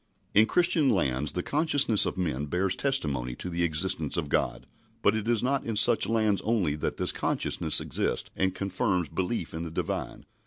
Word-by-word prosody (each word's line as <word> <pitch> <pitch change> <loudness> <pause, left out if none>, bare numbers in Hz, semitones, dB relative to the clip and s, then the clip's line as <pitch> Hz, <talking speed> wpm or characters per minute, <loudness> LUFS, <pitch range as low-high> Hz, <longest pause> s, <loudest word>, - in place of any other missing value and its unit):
In 110 +2 +5
Christian 170 -5 +3
lands 75 - 0
the 90 - -2
consciousness 145 -7 +3
of - - -4
men 75 -6 -2
bears 90 +5 0
testimony 70 - -1
to 90 - -6
the 85 +1 -2
existence 80 -2 -1
of 75 -4 -2
God, - - -1 0.4
but - - +4
it 110 0 -3
is 120 -2 +1
not 135 +2 0
in 115 - -3
such 105 - +5
lands 110 -3 +1
only 105 -9 0
that - - -3
this - - 0
consciousness - - 0
exists - - -3
and 95 0 0
confirms 95 - -1
belief 90 - -3
in 80 - -4
the 85 - -5
Divine. 80 - -4
95 Hz, 185 wpm, -27 LUFS, 80-115 Hz, 0.4 s, In